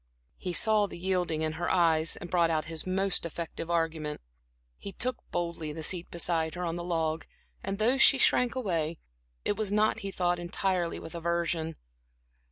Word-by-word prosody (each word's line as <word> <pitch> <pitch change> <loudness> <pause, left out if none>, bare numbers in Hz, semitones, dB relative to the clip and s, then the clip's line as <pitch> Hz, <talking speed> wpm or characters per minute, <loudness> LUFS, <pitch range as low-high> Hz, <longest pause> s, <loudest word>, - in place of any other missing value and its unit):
He 180 - -3
saw 215 +2 +5
the - - -9
yielding 175 -3 -1
in 155 - 0
her 175 +3 -3
eyes 165 -2 +3
and 175 - -8
brought 170 -2 +3
out 155 -1 0
his 160 +1 -4
most 190 +1 0
effective 170 0 -5
argument. 160 -3 -1 0.6
He 200 - -7
took 250 +3 0
boldly 170 -3 -3
the 160 +1 -6
seat 175 +1 0
beside 165 -1 0
her 180 - -4
on 165 -1 -2
the 175 - -4
log 165 -2 -1 0.4
and 195 0 -3
though 235 +5 +3
she 270 - +7
shrank 250 -1 +3
away, 170 -9 -1 0.5
it 205 - 0
was 215 -2 0
not, 210 +1 +2
he 195 - -5
thought, 175 -2 0
entirely 175 0 -1
with 160 - -9
aversion. 170 -1 -1
170 Hz, 175 wpm, -29 LUFS, 165-190 Hz, 0.6 s, she